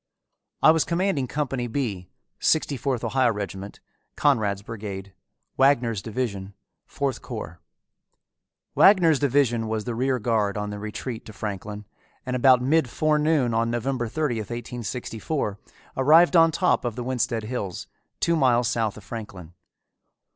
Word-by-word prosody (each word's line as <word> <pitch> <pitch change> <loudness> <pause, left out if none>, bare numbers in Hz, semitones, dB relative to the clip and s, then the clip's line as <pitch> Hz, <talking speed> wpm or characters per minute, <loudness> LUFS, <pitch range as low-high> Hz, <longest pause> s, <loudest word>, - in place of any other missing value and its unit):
I 155 - +9
was 160 -1 +2
commanding 170 -6 0
Company 135 -3 -2
B, 110 -8 -3 0.3
Sixty 155 -2 +2
fourth 130 -2 -2
Ohio 130 -3 +2
regiment, 100 -1 -6 0.4
Conrad's 105 -9 +1
brigade, 100 -3 -7 0.4
Wagner's 120 -6 +3
division, 100 -4 -4 0.3
Fourth 140 -3 -3
corps. 85 +3 -7 1.1
Wagner's 170 -7 +5
division 125 -5 +2
was 110 -1 -2
the 120 - -4
rear 130 +2 0
guard 105 -3 0
on 105 0 -3
the 105 - -6
retreat 110 +3 -6
to 110 - -10
Franklin, 105 0 -6 0.4
and 125 -1 -2
about 125 0 +5
mid 150 0 +2
forenoon 150 -3 +1
of 115 +1 +1
November 120 +1 -1
30, 145 -1 -1
1864, 120 +1 -4 0.4
arrived 160 +7 +5
on 165 -1 +7
top 180 +2 +1
of 120 -3 -3
the 125 - -4
Winsted 120 -2 -1
Hills, 105 -5 -4 0.3
two 170 - +2
miles 125 -5 +3
south 110 -3 -1
of 105 - -12
Franklin. 95 -7 -8
120 Hz, 135 wpm, -25 LUFS, 105-140 Hz, 1.1 s, I